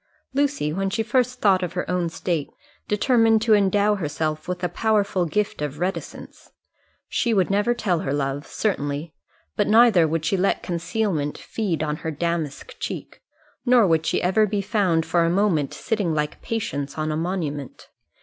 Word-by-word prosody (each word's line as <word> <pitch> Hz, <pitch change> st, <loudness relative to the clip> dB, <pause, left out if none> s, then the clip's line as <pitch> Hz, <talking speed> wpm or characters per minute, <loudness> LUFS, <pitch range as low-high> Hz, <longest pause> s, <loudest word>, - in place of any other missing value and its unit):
Lucy, 280 Hz, -, 0 dB
when 195 Hz, +2 st, -1 dB
she 225 Hz, +3 st, -1 dB
first 250 Hz, +1 st, 0 dB
thought 190 Hz, -3 st, +4 dB
of 180 Hz, -1 st, -3 dB
her 180 Hz, -, -3 dB
own 180 Hz, -2 st, 0 dB
state, 165 Hz, -3 st, -2 dB, 0.4 s
determined 225 Hz, +1 st, +3 dB
to 220 Hz, 0 st, +3 dB
endow 205 Hz, +1 st, +3 dB
herself 155 Hz, -4 st, -3 dB
with 180 Hz, 0 st, -4 dB
a -, -, +3 dB
powerful 205 Hz, -3 st, +1 dB
gift 205 Hz, 0 st, -1 dB
of 150 Hz, -1 st, -3 dB
reticence. 180 Hz, +4 st, -5 dB, 0.6 s
She 235 Hz, -2 st, 0 dB
would 190 Hz, -1 st, +2 dB
never 210 Hz, +4 st, +2 dB
tell 190 Hz, -8 st, 0 dB
her 135 Hz, -, -3 dB
love, 140 Hz, 0 st, -2 dB
certainly; 150 Hz, -6 st, -2 dB, 0.4 s
but -, -, +1 dB
neither 215 Hz, -6 st, +6 dB
would 160 Hz, 0 st, -2 dB
she 190 Hz, +4 st, +1 dB
let 195 Hz, +2 st, +1 dB
concealment 170 Hz, -3 st, -2 dB
feed 185 Hz, -8 st, -2 dB
on 150 Hz, 0 st, -2 dB
her 160 Hz, -, -4 dB
damask 160 Hz, -2 st, -3 dB
cheek, -, -, -6 dB, 0.4 s
nor 245 Hz, -3 st, +5 dB
would 160 Hz, -3 st, +2 dB
she -, -, 0 dB
ever 195 Hz, +4 st, +3 dB
be 205 Hz, 0 st, -1 dB
found 195 Hz, -6 st, +1 dB
for 170 Hz, -1 st, +2 dB
a 165 Hz, -, +2 dB
moment 175 Hz, -6 st, +1 dB
sitting 205 Hz, -9 st, -1 dB
like 150 Hz, 0 st, -2 dB
Patience 145 Hz, -12 st, -3 dB
on 155 Hz, 0 st, -1 dB
a -, -, -1 dB
monument. 155 Hz, -5 st, -4 dB
180 Hz, 170 wpm, -23 LUFS, 155-210 Hz, 0.6 s, neither